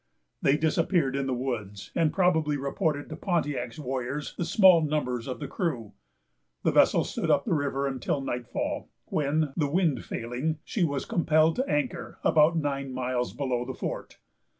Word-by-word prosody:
They 140 +2 +4
disappeared 160 -2 +1
in 140 -1 -1
the 130 - 0
woods, 110 -6 -4
and 165 -3 +2
probably 160 -6 +2
reported 145 +2 -1
to - - -5
Pontiac's 145 - -2
warriors 135 0 -3
the 175 - -2
small 185 -4 +6
numbers 140 -6 -1
of 130 - -4
the - - -4
crew. 135 - -3 0.7
The - - +3
vessel - - +5
stood - - -3
up - - +3
the - - +1
river 140 -2 0
until 135 +1 -1
nightfall, 125 -3 -3 0.2
when, 150 0 0
the 150 -4 +1
wind 160 -4 +1
failing, 125 +7 -3
she 195 - -1
was 140 -4 -1
compelled 160 0 +3
to 260 +2 -1
anchor 290 -4 -2
about 160 +2 +4
nine 140 -3 -2
miles 125 -1 -1
below 130 -4 -1
the 130 +1 -6
fort. - - -5
145 Hz, 165 wpm, -27 LUFS, 130-160 Hz, 0.7 s, small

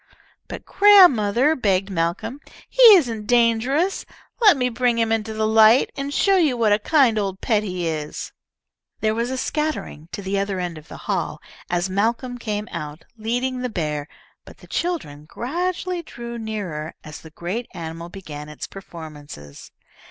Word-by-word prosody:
"But, - - -8
grandmother," 305 - +5
begged 195 -5 0
Malcolm, 185 +9 -2 0.3
"he - - -1
isn't 230 - 0
dangerous. 245 - +2 0.4
Let 415 -9 +7
me 250 -1 +1
bring 245 0 0
him 225 -1 +1
into 225 0 -1
the 220 0 -1
light, 220 +3 +5
and 280 0 -4
show 390 +6 +3
you 300 -8 +2
what 220 -3 +3
a 205 - +2
kind 250 -3 +3
old 195 -2 -3
pet 215 -3 +1
he 180 -4 -3
is." 155 -2 -4 0.7
There 215 0 +1
was 235 +2 -1
a 260 - -3
scattering 300 - -3
to 200 - -6
the 195 +1 -1
other 195 -1 -2
end 175 -3 -4
of 155 - -18
the - - -10
hall - - -2 0.3
as 175 +1 0
Malcolm 230 +6 -1
came 210 -2 -3
out, 155 0 -7
leading 245 +3 -2
the 250 0 -2
bear, 150 -7 -3 0.4
but - - -15
the - - -16
children 230 - -3
gradually 350 - -3
drew 235 -6 -8
nearer 195 -9 -5
as 155 0 -10
the 160 - -12
great 185 +9 -5
animal 165 0 -7
began 150 -6 -9
its 150 - -7
performances. 150 - -11
220 Hz, 165 wpm, -22 LUFS, 175-250 Hz, 0.7 s, Let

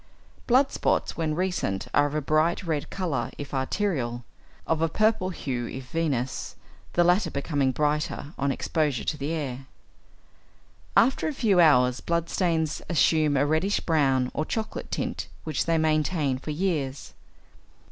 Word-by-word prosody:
Blood 260 +3 +4
spots - - 0
when 160 -2 -1
recent 180 - -1
are 145 0 +4
of 145 - -5
a 155 - -1
bright 155 +5 +2
red 160 -4 -2
colour 160 -11 -2
if 145 -1 -7
arterial, 130 - -1 0.4
of 160 -1 0
a 165 - +2
purple 215 0 +2
hue 125 -9 -3
if 130 -1 -8
venous, 135 -6 -2 0.4
the 175 - +4
latter 180 +5 +3
becoming 140 -1 0
brighter 150 +1 -1
on 140 0 0
exposure 150 -2 -1
to - - -1
the 145 +1 -3
air. 135 -5 -4 1.3
After 265 +6 +4
a 310 - -2
few 210 -8 +3
hours 125 -6 +5
blood 170 -1 -1
stains 165 -4 0
assume 155 -3 +3
a 140 - +3
reddish 160 +7 +1
brown 135 -6 +2
or 155 - -1
chocolate 220 +7 -4
tint, - - -3 0.2
which 155 -1 -2
they 165 -1 +3
maintain 155 -3 +1
for 145 - -8
years. 150 -5 -2
155 Hz, 150 wpm, -26 LUFS, 135-170 Hz, 1.3 s, hours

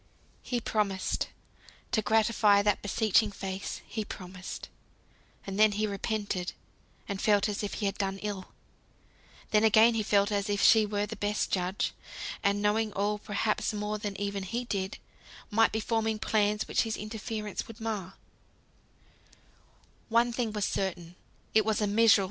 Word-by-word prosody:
He 245 - -2
promised; 205 -4 -1 0.6
to 230 -3 +2
gratify 215 -1 +4
that 205 -1 +2
beseeching 215 +1 +2
face 195 0 -5
he 220 - -4
promised. 185 -2 -8 0.8
And 195 +1 -4
then 215 -1 +6
he 215 +1 0
repented, 200 -2 -2 0.5
and 200 -2 -3
felt 205 -1 +3
as 205 -1 -2
if 205 - -3
he 210 - -2
had 195 - -1
done 195 -1 -1
ill. 200 -3 -3 1.1
Then 215 0 +4
again 220 +2 +6
he 225 - 0
felt 200 0 +2
as 200 0 0
if 205 -1 0
she 220 0 +6
were 205 0 -1
the 215 +2 -6
best 205 0 -1
judge, 185 +1 0 0.5
and 200 +1 +1
knowing 215 +1 +2
all 210 +1 0
(perhaps 210 +1 -1
more 210 0 -2
than 205 -2 -4
even 200 -1 -2
he 235 +6 -3
did) 195 -3 -3 0.5
might 225 +2 +4
be 220 - -1
forming 225 0 0
plans 210 -1 +1
which - - +2
his 225 -1 -2
interference 215 -1 -5
would 225 0 -11
mar. 215 -5 -4
210 Hz, 135 wpm, -29 LUFS, 200-220 Hz, 1.1 s, then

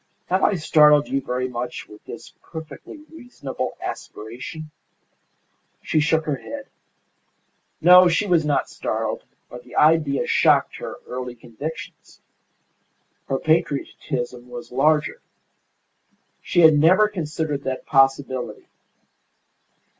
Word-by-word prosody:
Have 185 +1 +1
I 205 - +3
startled 150 -3 +4
you 135 - 0
very 125 0 -2
much 125 0 -5
with 105 - -15
this - - -10
perfectly 160 - -10
reasonable 245 - -6
aspiration?" 125 +8 -7 1.1
She 155 - +1
shook 160 +1 +1
her 145 -3 -1
head. 280 - -8 1.2
No, 180 +1 +8
she 175 +4 +1
was 175 -5 +3
not 150 -2 0
startled, - - -3 0.2
but 125 0 -11
the - - -14
idea 150 -3 +3
shocked - - +3
her - - -7
early 125 -1 -6
convictions. 125 +7 -9 1.1
Her 135 - 0
patriotism 135 -5 -2
was 120 -1 -9
larger. 150 - +1 1.2
She 175 - +1
had 160 -1 +8
never 185 +7 +5
considered 160 -6 -3
that 130 -1 -4
possibility. 135 -2 +1
150 Hz, 110 wpm, -22 LUFS, 130-160 Hz, 1.2 s, No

